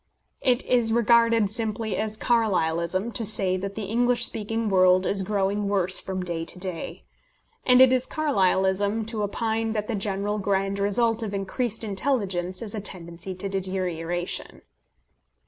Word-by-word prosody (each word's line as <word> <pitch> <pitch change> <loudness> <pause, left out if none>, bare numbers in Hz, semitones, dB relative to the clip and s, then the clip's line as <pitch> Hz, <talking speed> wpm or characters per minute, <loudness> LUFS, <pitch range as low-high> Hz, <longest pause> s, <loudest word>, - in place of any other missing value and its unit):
It 250 0 +1
is 240 -3 +2
regarded 230 -2 +3
simply 220 -1 0
as 215 0 -3
Carlylism 190 -3 0
to 230 - 0
say 195 -3 +6
that 195 +1 -6
the 220 - -4
English 240 +4 +2
speaking 225 +1 -2
world 185 -1 +4
is 195 - +1
growing 200 +1 -1
worse 190 -2 +2
from 185 -1 -5
day 170 -2 -3
to 170 - -9
day. 180 -3 -6 0.6
And 250 0 +6
it 260 0 +7
is 255 0 0
Carlylism 200 - 0
to 220 -2 -3
opine 220 +2 -2
that 210 -1 -3
the - - -3
general 205 0 -1
grand 195 0 -1
result 225 +3 +1
of 205 -3 -4
increased 225 +4 -2
intelligence 195 -4 -2
is 210 - -7
a 215 - -4
tendency 180 -1 -7
to 185 +2 -5
deterioration. 180 -3 -4
200 Hz, 150 wpm, -25 LUFS, 190-225 Hz, 0.6 s, it